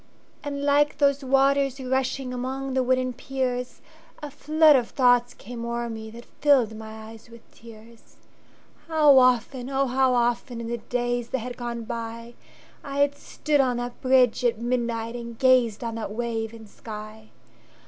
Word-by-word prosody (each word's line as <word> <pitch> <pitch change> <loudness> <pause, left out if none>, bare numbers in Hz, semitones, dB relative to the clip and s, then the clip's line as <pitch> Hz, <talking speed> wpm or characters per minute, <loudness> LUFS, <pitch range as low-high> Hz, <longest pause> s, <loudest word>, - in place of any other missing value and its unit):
And 285 -1 -4
like 290 +1 +2
those 280 -1 +2
waters 275 0 +2
rushingAmong 260 0 -3
the 260 - +2
wooden 255 0 0
piers,A 270 +5 -6
flood 310 +1 +4
of 245 -3 +1
thoughts 245 -2 +3
came 235 +2 -8
o'er 235 0 -3
meThat 220 +1 -9
filled 260 -7 +3
my 220 0 -9
eyes 225 0 -15
with 235 0 -15
tears. 230 0 -16 0.7
How 300 -4 +6
often, 255 0 +1
oh 275 0 +1
how 260 0 +2
often, 240 0 0
In 230 0 -5
the 235 0 -3
days 245 +1 -2
that 265 - -1
had 245 0 -6
gone 240 -1 -5
by,I 235 +4 -9
had 285 0 +2
stood 290 0 0
on 250 -2 0
that 245 0 -6
bridge 255 -2 +3
at 235 -2 +2
midnightAnd 235 -1 -3
gazed 250 -4 +3
on 230 -1 -3
that 225 -2 -5
wave 225 0 -3
and 225 -1 -12
sky! 215 0 -10
245 Hz, 150 wpm, -25 LUFS, 230-270 Hz, 0.7 s, How